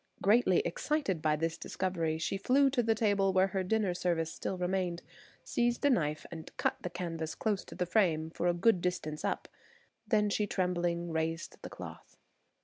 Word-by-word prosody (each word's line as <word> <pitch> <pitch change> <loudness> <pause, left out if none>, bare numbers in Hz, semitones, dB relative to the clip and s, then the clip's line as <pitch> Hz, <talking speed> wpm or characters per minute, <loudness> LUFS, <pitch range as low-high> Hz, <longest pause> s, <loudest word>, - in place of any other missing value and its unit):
Greatly 205 -2 +4
excited 195 - -1
by 155 -1 +2
this 165 +1 -2
discovery, 170 -4 -1
she 160 +4 -1
flew 270 +7 +3
to 255 -2 +2
the 225 -1 +2
table 200 -3 +2
where 190 +1 +4
her 190 0 -1
dinner 205 -1 +1
service 170 -2 -1
still 190 - -3
remained, 180 -1 -1 0.4
seized 240 +3 0
a 285 - +6
knife 155 - 0
and 160 -2 -7
cut - - +1
the 180 - -3
canvas 165 -2 -4
close 210 -4 -1
to - - -11
the 180 - 0
frame 165 -5 +2
for 175 - -1
a 175 - +4
good 190 +1 +3
distance 170 -4 -2
up. - - -2 0.6
Then 210 -3 +2
she 210 0 +1
trembling 175 -2 -1
raised 160 +1 -2
the - - -7
cloth. - - -10
180 Hz, 180 wpm, -32 LUFS, 165-205 Hz, 0.6 s, a